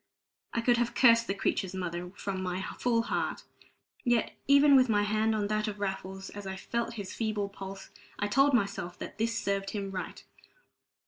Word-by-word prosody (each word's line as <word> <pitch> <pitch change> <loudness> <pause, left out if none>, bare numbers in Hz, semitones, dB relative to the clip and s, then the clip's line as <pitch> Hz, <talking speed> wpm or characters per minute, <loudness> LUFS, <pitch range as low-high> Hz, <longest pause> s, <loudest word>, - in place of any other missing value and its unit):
I 235 - -1
could 240 +1 +3
have 240 0 0
cursed 230 -2 +6
the 195 - -1
creature's 190 -1 -1
mother 180 -1 -4
from 195 -2 -4
my 185 0 -2 0.2
full 230 -2 +2
heart; - - -2 0.6
yet 240 -2 +2
even 280 +1 +7
with 255 -2 +5
my 205 -2 +3
hand 215 +1 +1
on 210 -1 0
that 215 0 0
of 210 -1 -4
Raffles, 190 -1 -4
as 205 -1 -7
I 190 - -4
felt 235 +4 -3
his 200 -4 -6
feeble 215 -3 -1
pulse, 195 0 -9 0.3
I 205 - 0
told 275 +6 +4
myself 195 -5 -1
that - - -8
this 230 +1 0
served 200 -1 -1
him 200 -2 -4
right. 185 -1 -6
205 Hz, 185 wpm, -30 LUFS, 195-230 Hz, 0.6 s, even